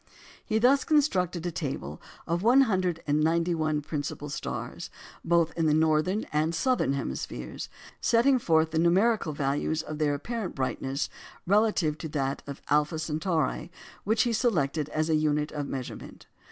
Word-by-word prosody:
He 215 - 0
thus 260 +5 +4
constructed 185 - +1
a 175 - -1
table 130 - -5 0.2
of 170 +1 -1
191 170 - +2
of 155 - 0
the - - -26
principal 145 -1 -4
stars, - - -5 0.3
both 170 -1 +2
in 165 -1 +1
the 150 - +3
northern 160 +6 +2
and 155 +2 +1
southern 250 - +1
hemispheres, 65 - -5 0.3
setting 255 +3 +4
forth 160 -5 +2
the 160 - 0
numerical 185 +2 +3
values 145 +2 -1
of 155 0 -6
their 145 -2 +2
apparent 220 +5 -4
brightness 135 +1 -2 0.4
relatively 195 -6 +2
to 160 - -6
that 140 -2 -2
of 140 -1 -8
Alpha 150 +2 +2
Centauri, 160 +2 -1 0.3
which 220 +2 +2
he 240 - 0
selected 160 - 0
as 155 +1 -1
a 160 - +1
unit 150 -1 +1
of 145 -2 -4
measurement. 130 -2 -7
160 Hz, 150 wpm, -28 LUFS, 150-190 Hz, 0.4 s, thus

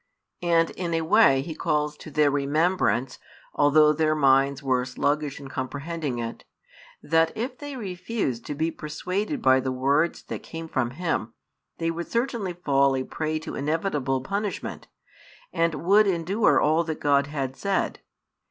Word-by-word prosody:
And 170 -1 +2
in 170 -2 -3
a 165 - +1
way 160 -7 +5
He 160 - -6
calls 150 -1 -1
to - - -10
their 150 -1 +3
remembrance, 145 -2 +1 0.3
although 150 +1 +5
their 155 0 +1
minds 140 -1 +3
were 130 -2 +1
sluggish 145 +3 -1
in 140 - -9
comprehending 140 +1 -4
it, 115 -1 -5 0.6
that 165 0 +3
if 245 +3 -4
they 290 -1 -6
refused 185 - -3
to 145 - -3
be 160 +3 0
persuaded 190 - -3
by 130 0 +5
the 130 0 -2
words 140 +6 +1
that - - -6
came 165 0 -7
from 130 -6 -1
Him, 155 -10 -2 0.4
they 165 0 -1
would 170 +1 -5
certainly 230 -6 -1
fall 140 -5 +2
a 130 - -1
prey 155 +3 -3
to - - -7
inevitable 145 -3 -1
punishment, 200 +7 -4 0.7
and 165 -1 +1
would 200 +6 +4
endure 190 +4 +2
all 155 +3 +3
that 160 -1 -4
God 140 -1 +2
had 135 -3 -3
said. 200 +4 -1
155 Hz, 155 wpm, -25 LUFS, 140-175 Hz, 0.7 s, way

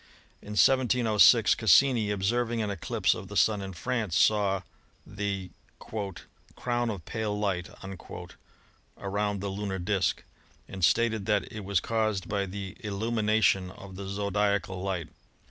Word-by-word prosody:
In 105 - -8
1706 120 -2 +5
Cassini, 115 +1 +4
observing 115 +4 0
an 105 -2 -1
eclipse 95 -4 0
of - - -8
the - - -5
Sun 105 -2 +3
in 95 -1 -6
France, 105 0 -1
saw 100 -3 +3 0.4
the 100 -2 -4 1.0
"crown 120 -1 -1
of 95 -7 -5
pale 110 -2 -2
light" 95 -4 -1 1.3
around 100 0 -2
the 100 - -3
lunar 100 0 -3
disk, 95 0 0 0.4
and 95 -2 -7
stated 110 +3 +2
that 105 -3 +1
it 105 -1 -6
was 100 -1 +1
caused 110 -3 -1
by 100 -1 -1
the 95 0 -6
illumi 110 +2 -2
nation 105 -3 +3
of 95 0 -11
the 95 0 -6
zodiacal 100 -1 -1
light. 90 -5 -3
100 Hz, 135 wpm, -28 LUFS, 95-110 Hz, 1.3 s, 1706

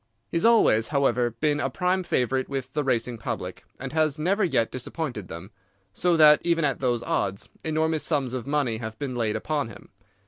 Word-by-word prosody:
He - - 0
has 165 - +1
always, 220 - +5
however, 135 -4 +1
been 145 +6 -1
a 135 - 0
prime 180 +6 0
favourite 130 -6 0
with 135 -1 -4
the 150 - 0
racing 120 -3 -1
public, - - -5
and 135 +1 -6
has 155 -2 +1
never 190 +7 +1
yet 130 -10 +1
disappointed 125 - -5
them, 85 +5 -9 0.4
so 175 +5 +2
that 150 -1 +7
even 170 -2 +2
at 140 -3 0
those 120 -3 0
odds 100 0 -2
enormous 160 0 0
sums 140 -6 0
of 125 -1 -4
money 140 -6 0
have 110 -1 -6
been 135 -1 -4
laid 110 -3 0
upon 145 +4 -1
him. 115 - -13
135 Hz, 195 wpm, -25 LUFS, 120-155 Hz, 0.4 s, that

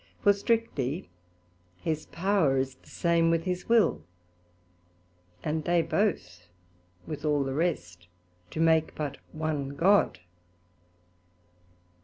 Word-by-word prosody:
For 205 - +6
strictly 195 - -1 0.7
his 155 - -3
power 175 -7 +1
is 130 0 -1
the - - -22
same 170 -1 +2
with 165 0 +1
his 180 +1 -3
will, 230 - +4 1.4
and 155 +1 -1
they 170 +1 +2
both 155 - -1 0.6
with 155 - -6
all 150 -2 +2
the 135 0 -3
rest 90 - -2 0.4
do - - -6
make 160 -1 +3
but 145 -2 -4
one 150 -3 -3
God. 195 - +4
160 Hz, 110 wpm, -28 LUFS, 140-180 Hz, 1.4 s, For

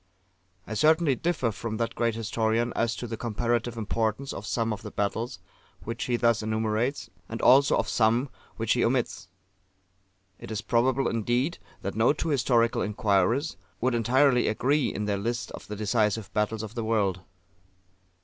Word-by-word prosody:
I 110 - -6
certainly 155 +4 +4
differ 135 -3 0
from 110 +1 -5
that 115 0 -1
great 115 -2 0
historian 115 +1 0
as 115 -1 0
to - - -5
the 115 -1 -5
comparative 120 +1 -1
importance 110 +4 -1
of 100 - -7
some 115 0 0
of 105 - -7
the - - -7
battles 110 +5 -2 0.5
which 115 +1 -4
he 125 - 0
thus 115 -1 +2
enumerates, 110 +4 -1 0.2
and 115 - -5
also 135 +3 +5
of - - 0
some 120 +4 +2 0.3
which 115 -1 +1
he 120 - +1
omits. 120 -6 0 1.1
It - - -9
is 110 -2 -3
probable, 130 +3 +2
indeed, 120 +8 0 0.2
that 100 - -3
no 115 +6 +3
two 155 - -3
historical 120 -4 +2
inquirers 105 - +1 0.2
would 130 +1 +1
entirely 125 +2 +3
agree 135 +5 +1
in 105 - -3
their 100 -1 0
lists 120 +2 -3
of - - -9
the 105 - -5
Decisive 105 0 0
Battles 105 +1 -1
of 110 0 -7
the 120 -1 -3
World. 100 -5 0
115 Hz, 165 wpm, -27 LUFS, 110-125 Hz, 1.1 s, also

